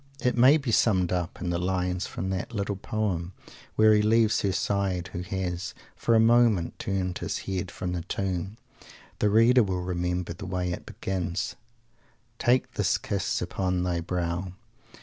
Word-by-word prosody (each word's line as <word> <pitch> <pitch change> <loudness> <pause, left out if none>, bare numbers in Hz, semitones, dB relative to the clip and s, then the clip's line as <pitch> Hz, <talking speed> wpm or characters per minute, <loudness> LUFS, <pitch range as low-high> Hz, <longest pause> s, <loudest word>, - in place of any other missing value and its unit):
It 125 - +1
may 130 +5 +7
be 135 -6 -3
summed 95 -6 +3
up 90 -1 -2
in 90 -1 -2
the 85 - 0
lines 90 0 -1
from 95 +1 -4
that 95 +5 -4
little 100 0 -1
poem, 95 -3 -2 0.4
where 110 0 +6
he 105 - +4
leaves 110 0 +3
her 100 - +1
side 95 -2 -1
who 90 - -3
has, 90 -1 -3 0.2
for 115 - +2
a - - +6
moment, 115 -6 +3
turned 95 -2 -2
his - - -3
heart 95 -2 -2
from 90 +1 -4
the 90 - -2
Tomb. 95 +3 -3 0.6
The 105 - +3
reader 115 +4 +6
will 95 -4 -1
remember 90 -1 -2
the 95 +3 -8
way 90 -1 -2
it 85 - -6
begins: 95 +2 -3 0.8
"Take 125 +1 +2
this - - +1
kiss 100 -2 -2
upon 90 -2 -1
thy 90 -1 0
brow." 90 +1 -2
95 Hz, 170 wpm, -27 LUFS, 90-105 Hz, 0.8 s, may